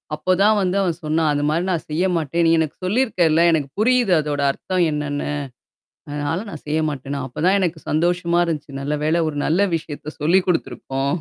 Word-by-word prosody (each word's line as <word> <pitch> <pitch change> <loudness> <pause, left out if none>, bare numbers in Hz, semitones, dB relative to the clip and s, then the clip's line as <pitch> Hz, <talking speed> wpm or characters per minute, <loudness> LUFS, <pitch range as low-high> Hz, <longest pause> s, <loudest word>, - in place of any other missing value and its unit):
அப்பதான் 185 +7 +3
வந்து 185 0 0
அவன் 175 -4 0
சொன்னான். 155 +1 +1
அந்தமாரி 150 +3 0
நான் 170 - -1
செய்ய 165 +5 0
மாட்டேன். 165 +1 0
நீ 165 - +4
எனக்கு 160 -2 -1
சொல்லியிருக்கள் 190 -6 +2
ல, - - +5
எனக்கு 155 -4 0
புரியுது 245 -3 +3
அதோட 150 -1 -2
அர்த்தம் 180 +5 -1
என்னன்னு? 150 -1 -3 0.8
அதனால 145 +3 -2
நான் 155 -6 -9
செய்ய 155 +1 0
மாட்டேன்ன. 140 -1 -5
அப்பதான் 180 +10 +1
எனக்கு 175 -3 -1
சந்தோஷமா 170 +2 +1
இருந்துச்சு. 150 -4 -4
நல்ல 145 +2 -2
வேள 165 +2 +2
ஒரு 145 - -6
நல்ல 170 +6 +2
விஷயத்த 155 -1 -6
சொல்லிக் 180 +5 +3
குடுத்துருக்கோம். 140 -3 -1
160 Hz, 170 wpm, -21 LUFS, 150-180 Hz, 0.8 s, ல